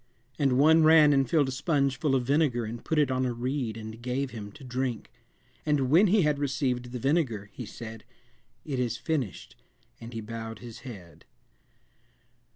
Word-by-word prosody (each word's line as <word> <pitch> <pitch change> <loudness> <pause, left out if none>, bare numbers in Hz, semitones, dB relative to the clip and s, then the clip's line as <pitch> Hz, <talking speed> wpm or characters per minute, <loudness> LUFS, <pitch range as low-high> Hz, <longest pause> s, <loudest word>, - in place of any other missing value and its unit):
And 135 -3 +2
one 160 +4 +6
ran 155 -2 +7
and 135 -3 +2
filled 150 -5 +3
a - - -3
sponge 140 -1 0
full 145 -4 +1
of 130 - +1
vinegar 135 -3 +1
and 115 +2 -7
put 160 - -1
it 145 -3 +3
on 130 0 0
a 125 -1 0
reed 125 -2 -2
and 110 +1 -8
gave 125 +2 -2
him 105 -3 -7
to - - -13
drink. 125 -2 -3 0.5
And 140 -4 +1
when 180 +7 +6
he 195 0 +4
had 150 -2 +1
received 135 -3 -1
the 125 - -4
vinegar, 125 -7 0
he 125 - -7
said, 110 -1 -9 0.6
It 135 -4 -3
is 120 -2 -1
finished, 140 - -3 0.4
and 115 0 -9
he 115 - -5
bowed 115 0 -6
his 120 -1 -10
head." 100 -10 -11
130 Hz, 180 wpm, -28 LUFS, 115-145 Hz, 0.6 s, ran